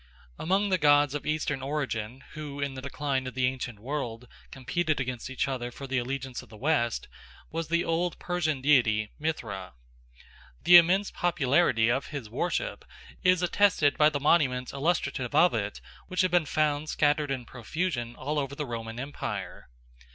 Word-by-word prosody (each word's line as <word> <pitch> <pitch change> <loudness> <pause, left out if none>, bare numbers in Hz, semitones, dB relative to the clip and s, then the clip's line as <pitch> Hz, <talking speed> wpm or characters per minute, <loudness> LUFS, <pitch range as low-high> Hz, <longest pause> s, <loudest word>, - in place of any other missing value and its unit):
Among 195 +4 +1
the 185 -1 +2
gods 145 -2 +5
of 150 - -4
eastern 150 -3 -1
origin 130 -4 -3
who 145 -2 -7
in 140 -1 -2
the 130 - -7
decline 140 -1 -2
of 130 - -7
the 130 -1 +2
ancient 125 -3 -3
world 125 -1 -4 0.2
competed 155 +4 -1
against 125 -2 -4
each 130 - -1
other 125 -3 -3
for 135 +3 -9
the 135 -1 0
allegiance 130 +1 -4
of - - -17
the 110 - -12
West 125 -4 0 0.4
was 165 0 -3
the 170 +1 +1
old 170 +1 0
Persian 160 -6 -1
deity 115 -7 +3
Mithra. 105 - -4 0.9
The 175 - +10
immense 185 +4 +4
popularity 140 -8 +2
of 130 +3 0
his 135 -8 -7
worship 175 - -2 0.4
is 180 -1 +4
attested 180 -6 +3
by 150 0 +5
the 145 -2 -2
monuments 135 -4 +2
illustrative 140 -4 -1
of 175 0 +5
it 105 -2 -3 0.3
which 185 0 0
have 185 -1 +1
been 175 -4 +3
found 150 +1 0
scattered 150 0 +2
in 130 -3 -3
profusion 125 0 -3
all 150 +3 -2
over 140 -1 -3
the 150 - -3
Roman 115 -1 -5
Empire. 140 +3 -5
140 Hz, 165 wpm, -28 LUFS, 125-155 Hz, 0.9 s, The